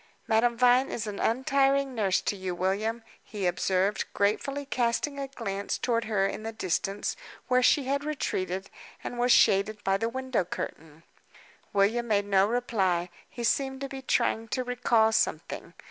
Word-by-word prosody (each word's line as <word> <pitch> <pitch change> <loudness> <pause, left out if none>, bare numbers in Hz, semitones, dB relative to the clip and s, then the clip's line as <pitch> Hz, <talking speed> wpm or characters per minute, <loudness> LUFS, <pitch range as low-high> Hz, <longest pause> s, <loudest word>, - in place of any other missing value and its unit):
"Madame 230 +1 +2
Vine 250 +2 +4
is 225 - -3
an 205 -2 -5
untiring 270 +3 +2
nurse 200 -6 +1
to - - -1
you, 185 -2 -4
William," 210 +6 -1 0.2
he 205 -3 -5
observed, 185 +3 +1
gratefully 275 +8 0
casting 255 +3 -1
a 275 - -3
glance 200 -7 -4
toward 230 -2 0
her 205 -3 +1
in 195 - -3
the 225 +1 -4
distance, 200 -1 -2 0.3
where 255 -1 +3
she 275 +3 +4
had 280 +2 -1
retreated, 190 -10 -3 0.3
and 240 - -5
was 245 +1 +3
shaded 205 0 +4
by 195 0 +2
the 225 +3 -1
window 260 -3 -1
curtain. 160 -2 -7 0.7
William 220 +4 +2
made 205 -2 +2
no 195 -1 +3
reply; 190 -7 0 0.2
he 240 - -7
seemed 265 +2 0
to 275 - -4
be 270 0 -7
trying 225 -3 0
to 240 +4 -2
recall 240 -3 +2
something. - - -1
225 Hz, 160 wpm, -28 LUFS, 195-255 Hz, 0.7 s, Vine